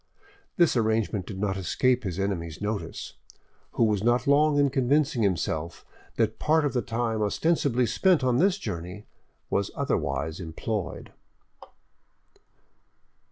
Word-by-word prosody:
This 170 -6 +4
arrangement 110 -4 0
did 100 - -6
not 95 -1 -1
escape 125 +7 +1
his 90 -3 -3
enemy's 85 -5 -3
notice, 105 0 -5 0.6
who - - +2
was 105 -3 +1
not 120 +2 +2
long 145 +1 +4
in 140 -1 +3
convincing 135 0 +1
himself 85 -5 -1 0.3
that 110 -1 0
part 155 0 +2
of 145 - -1
the 125 - +1
time 115 -2 -2
ostensibly 125 +2 +1
spent 180 - +2
on 125 -1 +2
this 190 +3 +3
journey 90 - -6 0.5
was 100 0 0
otherwise 80 +2 -2
employed. 90 +4 -4
110 Hz, 125 wpm, -26 LUFS, 95-135 Hz, 0.6 s, This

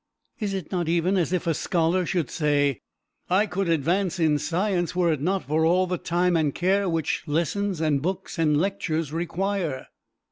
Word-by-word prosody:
Is 205 -3 -2
it 185 -5 -6
not 175 -4 -1
even 175 +3 +2
as 175 -3 +1
if 180 -1 -1
a 165 - +2
scholar 170 +3 0
should 175 -7 -1
say, 145 - +1 0.5
I 190 +4 +3
could 195 -2 -2
advance 170 +4 +1
in 155 -3 +3
science 175 +3 -1
were 175 -3 +3
it 145 - -4
not 190 +4 0
for 155 +2 0
all 180 +3 +3
the 180 -1 -3
time 175 +1 +1
and 155 -4 +1
care 190 +2 +1
which 165 -3 -1
lessons, 170 +5 -1
and 150 -3 +1
books, 185 +2 -4
and 150 -2 +3
lectures 165 -5 -1
require? 175 -3 -2
175 Hz, 180 wpm, -25 LUFS, 155-185 Hz, 0.5 s, I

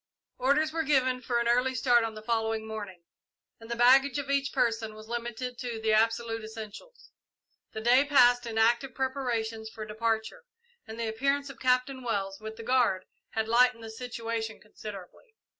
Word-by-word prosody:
Orders 285 +5 +2
were 325 - 0
given 260 -4 +2
for 245 -2 -1
an 235 0 +1
early 250 +2 +2
start 240 -1 +4
on 225 -1 -3
the 215 - -9
following 225 -1 -1
morning, 205 -5 -7 0.6
and 225 0 -13
the 235 - -2
baggage 260 +4 +5
of 280 -1 -3
each 275 0 +1
person 225 -2 0
was 215 0 -12
limited 240 +1 -4
to 240 -3 -4
the 220 0 +1
absolute 225 +1 +1
essentials. 220 - -10 0.6
The 220 - -5
day 245 +4 +5
passed 245 -4 +4
in 225 -1 -4
active 235 +3 +2
preparations 235 -5 -2
for 220 -1 -7
departure, 220 - -2 0.4
and 220 +1 -8
the 230 - -1
appearance 275 +5 0
of - - -16
Captain 255 +1 +1
Wells, 195 -5 -2
with 220 0 -7
the 225 - -9
guard, 235 -6 +2 0.3
had 220 0 -1
lightened 240 0 +3
the 225 - -7
situation 230 -2 -4
considerably. 210 - -11
235 Hz, 175 wpm, -29 LUFS, 220-255 Hz, 0.6 s, baggage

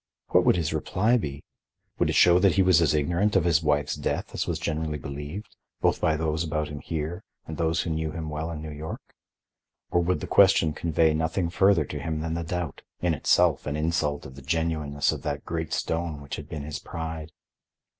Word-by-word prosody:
What - - +4
would - - +5
his 85 -4 -1
reply 110 +6 +1
be? 70 - -5 0.6
Would - - +2
it - - 0
show 90 0 +6
that 95 -2 +4
he 95 - +5
was 90 -3 +5
as 75 -2 +3
ignorant 85 +8 +1
of 95 - +4
his 85 -2 +3
wife's 75 -2 +1
death - - -3
as - - -2
was - - -1
generally 80 -1 -2
believed, 75 +8 -7 0.2
both - - +1
by 80 -1 +2
those 80 0 -1
about 75 -1 -2
him 75 -1 -6
here 80 +6 -4 0.2
and 80 - -6
those 80 0 0
who 85 - -3
knew 80 0 -1
him 80 0 -5
well 80 +2 -3
in 80 -2 -6
New 80 - -6
York? 75 +2 -8 0.8
Or 85 - +3
would 85 -1 0
the - - -5
question 80 -2 +5
convey 80 0 +2
nothing 85 +2 -1
further 95 -2 +4
to - - -5
him 80 -1 -3
than 80 0 -2
the 85 - -2
doubt—in 90 0 -3
itself 75 - +2
an 75 - -1
insult 75 -2 -1
of 65 - -9
the 70 - -11
genuineness 75 -1 0
of - - -5
that - - -4
great 80 -1 -3
stone 80 -2 -2
which 70 -1 -6
had - - -9
been 75 -2 -5
his 75 0 -5
pride? 80 -2 -6
80 Hz, 210 wpm, -26 LUFS, 75-85 Hz, 0.8 s, show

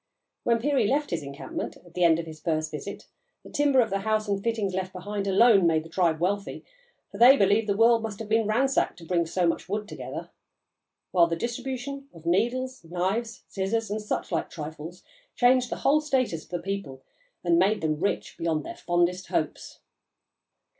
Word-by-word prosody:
When 235 -1 +2
Peary 265 -2 +1
left 290 +5 0
his 170 - -1
encampment, 140 -1 -6
at 175 -1 -19
the 180 - 0
end 165 -2 +5
of 170 - -4
his 155 -1 -10
first 155 -1 -1
visit, 155 +7 -7 0.4
the - - -13
timber 285 -3 +4
of 225 -3 -1
the 195 - 0
house 215 +1 0
and 200 -1 -1
fittings 220 -5 -1
left 185 0 -3
behind 200 +2 -4
alone 200 -2 +5
made 160 -1 +2
the 165 - -12
tribe 165 -3 +1
wealthy, 200 +3 -2 0.5
for 200 - -9
they 255 +4 +8
believed 205 +1 +3
the 200 - +1
world 230 +1 +5
must 220 -3 -5
have 225 - -7
been 220 0 +2
ransacked 265 +5 +1
to 170 - -12
bring 170 -1 +1
so 180 +2 0
much 170 +2 -1
wood 210 +1 -2
together; - - -7 0.8
while 175 -2 +5
the 165 - -1
distribution 260 +5 -4
of 165 0 -14
needles, 245 +8 0
knives, 190 +7 -2
scissors, 205 +3 -2
and 215 +1 -2
such 210 - -3
like 165 - -1
trifles, 155 +2 -8 0.3
changed 250 0 +4
the - - -2
whole 300 +2 +5
status 255 - -1
of - - -27
the 175 - -2
people 170 -8 -5 0.4
and 170 -1 +3
made 200 +4 +2
them 155 -1 -1
rich 200 - -2
beyond 160 -3 -1
their - - -7
fondest 175 +1 0
hopes. - - -3
195 Hz, 195 wpm, -26 LUFS, 170-230 Hz, 0.8 s, they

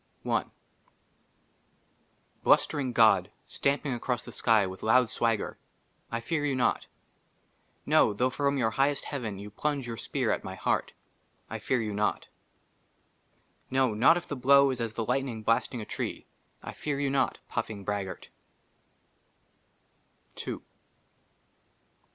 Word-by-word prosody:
57 - - -2
LIU - - 0 1.9
BLUSTERING 135 -4 +3
GOD, 110 -6 +4
STAMPING 140 -1 -1
ACROSS 120 +1 -2
THE - - -8
SKY 110 -4 +3
WITH 95 0 -7
LOUD 120 +1 +4
SWAGGER, 115 -3 -1 0.5
I 115 - -1
FEAR 150 +5 -2
YOU 145 -2 0
NOT. 125 - +1 1.0
NO, 105 - +4
THOUGH 125 +5 +2
FROM 140 +1 0
YOUR 115 -4 +1
HIGHEST 140 +3 +1
HEAVEN 115 -8 -4
YOU 100 +1 -8
PLUNGE 145 +3 -2
YOUR 115 -1 -5
SPEAR - - -1
AT - - -1
MY - - -6
HEART, - - -1 0.6
I - - -4
FEAR 130 -2 0
YOU 105 -1 -3
NOT. 105 +1 -1 1.4
NO, 130 -3 +2
NOT 130 +11 +5
IF 175 - -6
THE 145 - -3
BLOW 140 +1 +5
IS 125 -2 -4
AS 115 -2 -2
THE 115 0 -2
LIGHTNING 125 -3 -1
BLASTING 115 +2 +1
A - - -6
TREE, - - -4 0.4
I - - -6
FEAR 145 -2 -3
YOU 140 -1 0
NOT, 140 - +1
PUFFING 105 -3 -3
BRAGGART. 95 -2 -4
120 Hz, 135 wpm, -29 LUFS, 110-140 Hz, 1.9 s, NOT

